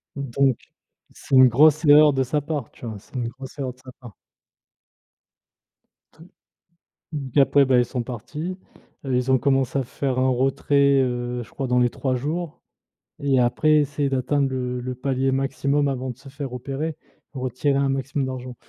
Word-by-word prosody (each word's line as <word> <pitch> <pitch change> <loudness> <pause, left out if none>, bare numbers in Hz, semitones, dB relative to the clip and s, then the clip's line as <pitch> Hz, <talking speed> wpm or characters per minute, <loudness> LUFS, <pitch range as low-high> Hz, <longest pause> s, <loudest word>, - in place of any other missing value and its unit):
Donc 135 -2 0 0.6
c'est 135 - -2
une 130 0 +8
grosse 155 +5 +4
erreur 150 0 +7
de 135 0 +1
sa 145 +4 -1
part, 145 -4 -4
tu - - -12
vois, 110 -3 -6
c'est 115 - -20
une 120 -2 -2
grosse 130 +3 -11
erreur 130 -3 -3
de 125 - -28
sa 130 - -11
part. 120 -6 -12 2.0
Te 160 - -17 0.9
D 140 -3 -1
après, 140 0 +4
bah, 130 -1 +3
ils 120 - +2
sont 125 -1 -4
partis, 150 - -6 0.5
heu, 130 -2 0
ils 125 +1 0
ont 130 - +5
commencé 135 0 +1
à - - -1
faire 130 +1 -3
un 130 0 +2
retrait, 135 +2 +2
heu, 125 -1 -2
je 115 - -17
crois 135 - -4
dans 125 0 +2
les 120 0 +3
3 130 +1 -2
jours 155 +5 -4 0.6
et 140 -2 +2
après 140 +5 +3
essayer 145 -1 0
d'atteindre 135 +2 0
le 125 -1 -3
le 130 +1 -4
palier 135 +1 -1
maximum 140 +2 0
avant 130 -1 -3
de 120 - -12
se 135 +1 -14
faire 140 0 -6
repérer, 135 +5 -4 0.4
retirer 130 +1 -1
un 140 0 +1
maximum 135 0 -2
d'argent. 130 -1 -6
135 Hz, 180 wpm, -23 LUFS, 125-140 Hz, 2.0 s, une